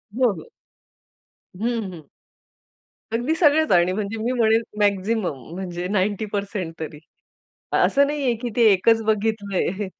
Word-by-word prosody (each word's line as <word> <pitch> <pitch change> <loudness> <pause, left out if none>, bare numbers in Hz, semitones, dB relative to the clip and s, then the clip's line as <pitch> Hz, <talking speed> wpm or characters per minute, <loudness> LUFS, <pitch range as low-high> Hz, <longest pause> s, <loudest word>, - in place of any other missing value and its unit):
हो, 250 -3 +3
हो. - - -11 1.1
हं, 225 -1 -2
हं. 155 -4 -12 1.1
अगदी 245 +7 0
सगळंच 315 - +3
आणि 175 0 +4
म्हणजे 210 +2 -3
मी 240 - 0
म्हणेल 225 0 +4 0.2
मॅक्सिमम 200 -5 0 0.2
म्हणजे 180 -1 -4
90% 200 -2 -2
तरी. 155 -1 -6 0.8
असं 280 0 +4
नाहीये 280 -4 0
की 245 - -2
ते 240 - +4
एकच 225 +4 +3
बघितलंय. 205 -2 -1
210 Hz, 120 wpm, -23 LUFS, 185-235 Hz, 1.1 s, आणि